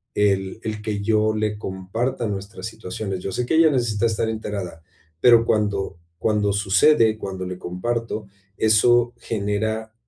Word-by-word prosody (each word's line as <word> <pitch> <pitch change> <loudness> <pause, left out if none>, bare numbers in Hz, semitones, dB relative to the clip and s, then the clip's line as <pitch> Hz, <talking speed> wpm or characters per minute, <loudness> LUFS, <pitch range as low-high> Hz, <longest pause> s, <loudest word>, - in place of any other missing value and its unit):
el 100 0 +1
el 110 -1 -4
que 105 -1 -3
yo 110 +1 +2
le 105 -1 -1
comparta 110 +6 -3
nuestras 100 +1 -6
situaciones. 100 -2 -5
Yo 95 - -4
sé 125 - -1
que - - -2
ella 160 0 +6
necesita 120 -5 0
estar 110 0 -1
enterada, 100 -7 -5 0.4
pero 120 -2 +6
cuando 100 -5 0 0.2
cuando 105 +1 +1
sucede, 110 +4 +4
cuando 95 -2 -5
le 90 0 -6
comparto, 110 +4 -3 0.3
eso 120 +2 +4
genera 110 +1 -2
105 Hz, 145 wpm, -23 LUFS, 100-115 Hz, 0.4 s, ella